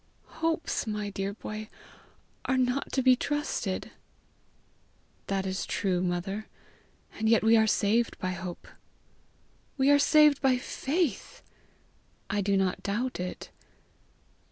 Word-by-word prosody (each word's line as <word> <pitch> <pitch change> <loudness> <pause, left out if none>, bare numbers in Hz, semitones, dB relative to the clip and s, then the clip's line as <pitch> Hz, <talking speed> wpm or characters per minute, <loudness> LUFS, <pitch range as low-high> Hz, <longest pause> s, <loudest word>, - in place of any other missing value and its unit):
"Hopes, 325 -6 -1
my 210 -1 -3
dear 195 0 -3
hoy, 215 +1 -6 0.8
are 260 - +1
not 255 +2 0
to 265 - 0
be 255 0 +6
trusted." 275 -9 -2 1.4
"That 195 -1 -1
is 190 0 -2
true, 185 -3 -1
mother; 185 +4 -2 0.7
and 220 0 +1
yet 225 -1 +4
we 225 +1 +6
are 220 -1 +4
saved 220 +3 +1
by 185 -2 -2
hope." 180 -1 -7 1.1
"We 270 +1 +4
are 285 - +6
saved 300 -1 +5
by 265 -2 +3
faith." 275 - -2 0.9
"I 205 -1 +1
do 200 0 +1
not 190 -1 0
doubt 235 +5 -2
it." 180 0 -6
215 Hz, 125 wpm, -28 LUFS, 195-260 Hz, 1.4 s, be